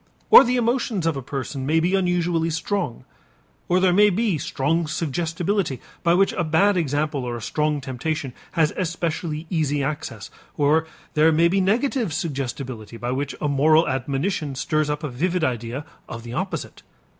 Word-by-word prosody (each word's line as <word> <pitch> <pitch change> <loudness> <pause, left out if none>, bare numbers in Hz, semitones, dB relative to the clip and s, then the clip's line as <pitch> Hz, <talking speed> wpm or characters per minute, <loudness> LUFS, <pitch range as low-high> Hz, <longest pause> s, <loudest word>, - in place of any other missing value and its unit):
Or 460 - +11
the 250 +1 0
emotions 235 -6 0
of 165 -2 +1
a 135 - -4
person 135 +1 -5
may 155 +4 +2
be 175 +3 +1
unusually 175 -3 +1
strong. 165 - -2 0.6
Or 180 +1 +4
there 185 -1 +3
may 210 +3 +6
be 205 -4 0
strong 160 +2 0
suggestibility, 165 - -1 0.2
by 170 0 +3
which 195 +2 +3
a 175 - -1
bad 170 +6 +3
example 145 -4 -1
or 120 -1 -3
a - - -8
strong 150 +2 0
temptation 135 +2 -3 0.2
has 160 -2 +2
especially 165 -2 -2
easy 145 -4 0
access. 135 -7 -5 0.3
Or 155 +2 +3 0.3
there 155 +1 +5
may 165 +2 +4
be 195 +2 +2
negative 230 - +1
suggestibility, 130 -7 -4
by 120 +1 -3
which 140 +2 -2
a 150 - -1
moral 155 +3 +4
admonition 140 +3 -2
stirs 155 +3 0
up 150 +1 -2
a - - -1
vivid 170 +7 -1
idea 125 +2 -2 0.2
of 115 0 -7
the 120 0 -7
opposite. 185 +7 -4
155 Hz, 170 wpm, -23 LUFS, 140-175 Hz, 0.6 s, Or